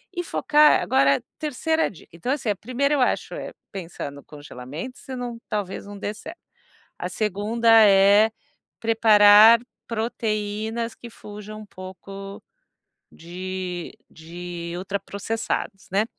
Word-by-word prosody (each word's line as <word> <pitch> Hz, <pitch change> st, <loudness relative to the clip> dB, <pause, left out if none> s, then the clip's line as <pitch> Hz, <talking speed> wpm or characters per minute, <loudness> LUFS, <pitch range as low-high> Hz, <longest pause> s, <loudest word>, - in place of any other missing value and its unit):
e 350 Hz, -, -1 dB
focar 300 Hz, -2 st, +4 dB
agora 140 Hz, -, +3 dB, 0.2 s
3ª 320 Hz, +2 st, 0 dB
dica, 175 Hz, -, -16 dB
então, 170 Hz, +9 st, -6 dB
assim, 265 Hz, -6 st, -1 dB
a 205 Hz, -, +1 dB
1ª, 265 Hz, +6 st, 0 dB
eu 285 Hz, -, +2 dB
acho, -, -, 0 dB
é -, -, -7 dB, 0.2 s
pensar 175 Hz, -6 st, -6 dB
no 140 Hz, 0 st, -12 dB
congelamento 145 Hz, -, -9 dB
se 260 Hz, -, -8 dB
não 245 Hz, -2 st, -5 dB
talvez 200 Hz, -2 st, -3 dB
não 205 Hz, 0 st, -9 dB
dê 205 Hz, +1 st, -4 dB
certo. 320 Hz, +10 st, -10 dB, 0.6 s
A -, -, -3 dB
2ª 215 Hz, +3 st, -1 dB, 0.2 s
é 200 Hz, +3 st, +6 dB, 0.5 s
preparar 220 Hz, 0 st, +7 dB, 0.3 s
proteínas 220 Hz, 0 st, -2 dB
que 235 Hz, -, -11 dB
fujam 210 Hz, 0 st, -10 dB
um 215 Hz, -, -10 dB
pouco 195 Hz, +1 st, -10 dB, 0.7 s
de 180 Hz, +1 st, -6 dB, 0.2 s
de 170 Hz, +1 st, -8 dB
ultraprocessados, 200 Hz, +2 st, -4 dB
né. 200 Hz, +3 st, +2 dB
205 Hz, 125 wpm, -24 LUFS, 185-230 Hz, 0.7 s, preparar